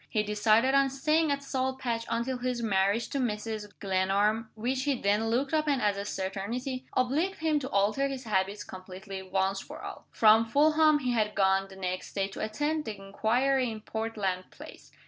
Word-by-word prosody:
He 215 - +1
decided 215 +4 +3
on 275 0 +4
staying 305 +3 +1
at 280 0 -1
Salt 265 -1 -2
Patch 235 -3 -3
until 245 +2 -1
his 245 -1 -2
marriage 200 +2 +1
to 280 - -2
Mrs. 215 -3 -3
Glenarm 200 +3 +1
(which 255 +4 -1
he 280 -4 0
then 205 +3 +1
looked 265 +6 0
upon 305 -3 +2
as 205 -4 +1
a 200 0 -4
certainty) 230 +8 -4
obliged 300 +10 +1
him 315 -2 +1
to 265 -1 -5
alter 215 +5 +2
his 270 -1 -5
habits 200 -1 -1
completely, 190 +1 -8
once 190 +1 0
for - - -10
all. - - -8
From 220 +1 +5
Fulham 305 +4 +4
he 255 -4 -1
had 215 -3 0
gone, 195 0 +3
the 195 - -13
next 185 -1 -4
day, 195 -1 0
to 195 - -9
attend 295 +8 -1
the 215 -3 -5
inquiry 240 +7 +1
in 220 -1 -6
Portland 210 -5 -3
Place. - - -13
225 Hz, 185 wpm, -29 LUFS, 200-265 Hz, -, From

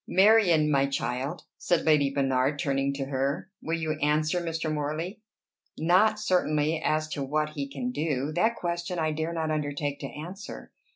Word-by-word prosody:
"Marion, 190 -6 +5
my 140 -1 +3
child," 135 +4 -3 0.2
said 175 -2 +1
Lady 150 -3 +4
Bernard, 135 0 +1
turning 140 -2 0
to 135 -1 -3
her, 140 +6 -2
"will 165 +1 -1
you 155 -1 -2
answer 155 +3 +1
Mr. 165 -2 -2
Morley?" 155 +7 -3 0.6
"Not, 190 +7 +4
certainly, 160 -6 +1
as 155 0 +1
to 145 - -4
what 150 +2 -1
he 140 -2 -4
can 130 -3 -3
do: 145 0 -1
that 220 +8 +2
question 175 0 -3
I 160 -1 +1
dare 160 +2 -2
not 160 -2 -2
undertake 145 -1 -2
to 140 - -4
answer. 180 +9 -8
155 Hz, 165 wpm, -27 LUFS, 140-170 Hz, 0.6 s, Marion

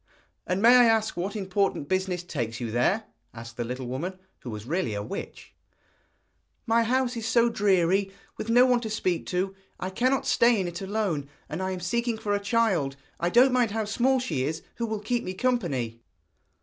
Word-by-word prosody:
'And 185 +3 0
may 245 +2 +8
I 245 - +7
ask 225 -1 +2
what 190 +4 -3
important 195 -6 -1
business 185 -1 -1
takes 120 -9 -4
you 120 -3 -4
there?' 190 - +2 0.3
asked 115 0 -9
the 120 - -2
little 125 +2 -5
woman, 155 +10 -4 0.2
who 125 - -8
was 105 -1 -6
really 155 - -1
a 100 - -3
witch. - - -7 1.1
'My 230 +1 +3
house 250 +2 +1
is 225 -1 -3
so 235 +1 +4
dreary, 195 -2 +2 0.2
with 220 - -6
no 245 +2 +6
one 250 -1 +3
to 225 -2 -5
speak 185 -5 -1
to; 190 +2 -1 0.3
I 185 - -3
cannot 255 +7 +1
stay 235 -2 +4
in 185 - -1
it 175 +1 -6
alone, 190 -8 -2 0.2
and 155 +5 -5
I 190 - -1
am 185 -1 -4
seeking 235 +5 -1
for 210 -2 -2
a 205 - +1
child 200 - +1 0.2
I 170 - +1
don't 250 +6 +5
mind 245 -3 +3
how 220 +1 -2
small 255 +5 +2
she 155 - -2
is 155 +4 -3
who 235 - -2
will 220 -2 -3
keep 235 +3 -1
me 185 - -5
company.' 150 - -1
195 Hz, 200 wpm, -27 LUFS, 165-230 Hz, 1.1 s, may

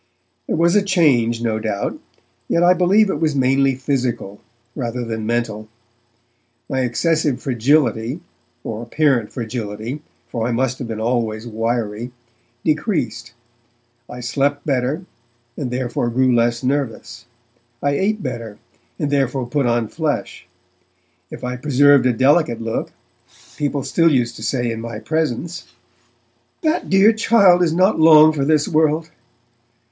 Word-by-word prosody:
There - - -1
was 170 +3 +2
a 205 - +5
change, 135 - +2
no 110 -2 0
doubt, 105 -2 -3 0.5
yet 170 - +1
I 180 +1 +6
believe 185 +4 +4
that 195 - -2
it - - -10
was 155 -3 +1
mainly 135 0 +2
physical, 125 -6 -3 0.3
rather 120 -2 -3
than 110 -1 -4
mental. 110 -2 -2 1.0
My 130 - -2
excessive 140 +2 0
fragility 125 0 +1 0.4
or 110 0 -5
apparent 120 -2 0
fragility, 115 +2 -5 0.3
for 115 -1 -3
I 120 - -1
must 130 +1 -1
have 125 - -5
been 110 -1 -5
always 115 -1 -1
wiry 115 0 -3 0.5
decreased; 155 - -1 0.8
I 125 0 -8
slept 140 +3 -1
better, 140 +5 -1 0.5
and 135 -4 -4
therefore, 125 -1 -2
grew 130 +1 +2
less 120 0 +1
nervous; 125 -3 -3 0.6
I 140 - +2
ate 200 +8 -1
better, 115 -5 -6 0.4
and 145 - -2
therefore 135 -2 0
put 135 +1 -1
on 120 -1 +1
flesh. 150 - -4 0.8
If - - -10
I 125 0 -3
preserved 145 0 +4
a - - +3
delicate 130 0 +2
look 115 0 -3 0.6
people 145 -2 -2
still 165 +3 +2
used 120 -4 0
to - - -10
say 120 0 -1
in 115 0 -5
my 115 -1 -6
presence, 160 +6 -3 1.0
'That 315 +2 0
dear 195 +3 +5
child 200 -5 +4
is 170 -3 +2
not 185 +3 +2
long 155 -1 +7
for 145 -3 -1
this 150 +1 +2
world!' 155 +1 +1
130 Hz, 140 wpm, -19 LUFS, 115-155 Hz, 1.0 s, long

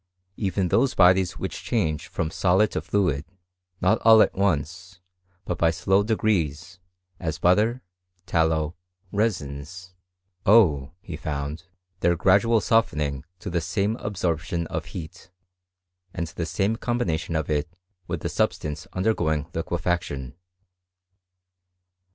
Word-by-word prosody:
Even 95 -2 -1
those 130 +7 +2
bodies 90 -1 +4
which - - -5
change 80 - -1
from 80 - -3
solid 95 +5 +3
to - - -2
fluid, 85 -9 0 0.6
not 95 +5 +3
all 110 -1 +8
at - - -1
once, 90 0 -1 0.5
but 90 - -3
by 85 - +4
slow 95 +4 +2
degrees, 95 -5 -1 0.4
as 80 -2 -3
butter, 110 +8 +2 0.4
tallow, 80 -1 +1 0.4
resins, 90 -3 -3 0.5
owe, 80 -11 +4
he 95 -6 -7
found, 75 +2 -4 0.3
their 85 0 +3
gradual 100 +6 +4
softening 75 - +1
to - - -11
the 85 -1 0
same 100 +5 0
absorption 85 -5 -2
of - - -2
heat, 90 +2 -9 0.9
and 85 - -2
the 85 - -4
same 105 +5 0
combination 95 -10 -1
of 80 -1 -1
it 75 0 -1 0.4
with - - -3
the - - -2
substance 75 +5 -2
undergoing 85 -7 0
lique 85 +2 -3
faction. 80 -7 -2
90 Hz, 120 wpm, -25 LUFS, 80-100 Hz, 0.9 s, all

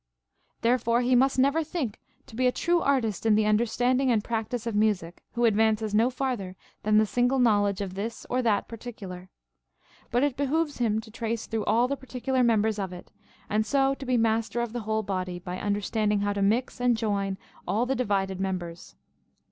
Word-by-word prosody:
*] - - -45
Therefore 235 0 +2
he 250 +1 +2
must 265 +2 +3
never 280 +5 +3
think 295 - -4 0.3
to - - -13
be 255 +2 +2
a - - +3
true 345 +6 +1
artist 240 -8 0
in 220 -2 +4
the 215 0 +3
un 215 0 +4
derstanding 245 +3 +1
and 225 -4 +2
practice 230 +1 -3
of 230 - -2
music, 205 -5 0
who 240 0 +1
advances 220 -1 +2
no 225 +4 +4
fartlier 245 -8 -3 0.3
than 215 0 +3
the 215 - +5
single 245 +4 +1
knowledge 205 -5 +3
of 190 -2 -4
this 210 +4 -5
or 255 +1 0
that 220 -4 +1
particular: 200 -6 -8 0.8
but 245 +3 +1
it 285 -3 +1
behooves 290 +2 -1
him 220 -3 +1
to 220 0 -14
trace 230 0 -3
through 220 -2 -3
all 230 +4 +3
the 280 - -1
particular 260 0 -2
members 220 -3 +2
of 190 -2 -3
it, 180 -1 -11 0.4
and 215 +1 +1
so 270 +4 +2
to 275 0 -8
be 255 -1 +2
master 225 +1 +1
of 235 -1 -2
the 240 - -2
whole 220 0 +1
body, 185 -3 -3
by 180 +1 -6
under 205 0 0
standing 210 -1 0
how 205 0 0
to 200 - -2
mix 230 +6 +1
and 245 -2 +3
join 200 -3 -1 0.3
all 210 +7 +1
the 265 - 0
divided 195 -6 -1
members. 180 -3 -4
225 Hz, 205 wpm, -27 LUFS, 205-250 Hz, 0.8 s, the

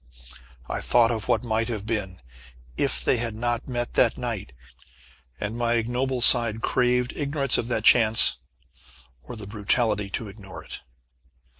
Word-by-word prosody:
I - - -4
thought 120 -1 +3
of 110 -2 -4
what - - +1
might 115 -1 -1
have 110 -4 -5
been, 100 -5 -4 0.5
if - - -2
they - - +2
had 115 -2 -3
not 120 +1 -3
met 120 -2 -4
that 120 -1 +2
night, 115 - -5 0.9
and 105 +2 -4
my 120 0 0
ignoble 125 +3 -2
side 115 -2 +4
craved 125 0 0
ignorance 140 -3 +2
of 115 - -3
that 120 - -2
Chance, 110 -2 +6 0.8
or 65 - -10
the 110 -3 -9
brutality 105 0 -1
to 110 +3 -5
ignore 100 -2 -11
it. - - -8
115 Hz, 150 wpm, -24 LUFS, 105-120 Hz, 0.9 s, Chance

